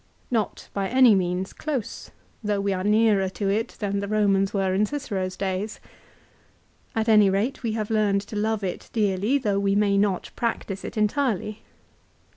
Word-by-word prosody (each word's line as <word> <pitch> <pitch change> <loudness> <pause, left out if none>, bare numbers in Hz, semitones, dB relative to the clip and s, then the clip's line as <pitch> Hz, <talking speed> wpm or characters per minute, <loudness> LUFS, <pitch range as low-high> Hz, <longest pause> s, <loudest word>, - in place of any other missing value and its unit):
Not 225 -4 -1
by 195 -1 -1
any 255 -3 +6
means 185 0 -1
close, 280 -8 -4 0.3
though 205 -1 0
we 200 0 0
are 185 0 -2
nearer 210 -2 +3
to 195 +1 -2
it 225 +4 -1
than 200 -1 -1
the 200 - -3
Eomans 195 -2 +2
were 195 -2 0
in 205 +3 +2
Cicero's 200 -10 -3
days. 195 +2 -3 1.2
At 225 0 0
any 210 -3 +6
rate 205 +8 -1
we 230 -3 -2
have 215 -1 -3
learned 205 -2 +2
to 205 +2 -9
love 215 0 0
it 185 -2 -4
dearly, 210 +3 +1
though 205 -7 0
we 200 0 +1
may 200 -1 +3
not 200 -3 0
practise 215 -4 -3
it - - -7
entirely. 215 -2 0
205 Hz, 170 wpm, -25 LUFS, 195-220 Hz, 1.2 s, any